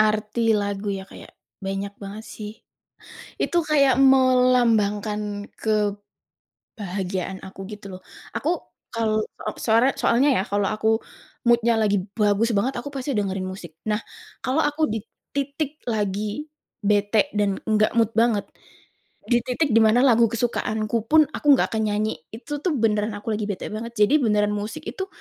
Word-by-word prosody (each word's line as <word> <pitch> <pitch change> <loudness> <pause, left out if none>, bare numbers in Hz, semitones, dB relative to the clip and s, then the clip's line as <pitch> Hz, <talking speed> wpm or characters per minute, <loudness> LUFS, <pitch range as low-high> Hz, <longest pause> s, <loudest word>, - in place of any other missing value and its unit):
Arti 215 +1 +1 0.2
lagu 205 0 -2
ya 190 -1 -5
kayak - - -12 0.3
banyak 195 +1 -3
banget 205 +2 -7
sih, 210 -1 -7 0.9
itu 345 - +1
kayak 280 -4 +4
melambangkan 225 -6 +3 1.1
kebahagiaan 190 -2 -5
aku 190 0 -11
gitu 210 -1 -9
loh. - - -27 0.4
Aku 310 - 0 0.4
kal 220 -2 +1 0.3
op - - -13
soare 230 +3 +4
soalnya 265 +5 +3
ya - - +1
kalau 205 0 +1
aku 215 +1 0 0.6
mood-nya 235 0 +4
lagi 205 -1 +2 0.2
bagus 210 +2 +3
banget, 250 +7 +1
aku 245 - -6
pasti 270 +1 -3
dengerin 195 -2 -1
musik. 185 -4 -8
Nah, 210 +1 +1 0.4
kalau 270 +5 +1
aku 295 +2 -1
di 225 - -1 0.4
titik 285 +2 -2
lagi 210 +5 -2 0.3
bete 205 +1 +2
dan 200 -2 +1
enggak 215 0 +3
mood 225 -1 +3
banget, 225 -3 +3 0.9
di 240 - +5
titik 280 +4 0
di - - +7
mana 220 +3 +4
lagu 235 -2 +5
kesukaanku 225 -2 -1
pun 315 0 +7
aku - - -8
nggak - - +2
akan 220 -1 0
nyanyi, 215 +1 0 0.2
itu 290 +6 -5
tuh 365 - +2
beneran 215 -3 +1
aku 210 - -5
lagi 210 0 -2
bete 195 - -4
banget. 230 +2 -5
Jadi 210 +9 +5
beneran 210 -3 +2
musik 210 +9 -5
itu 380 - -4
215 Hz, 150 wpm, -23 LUFS, 205-250 Hz, 1.1 s, di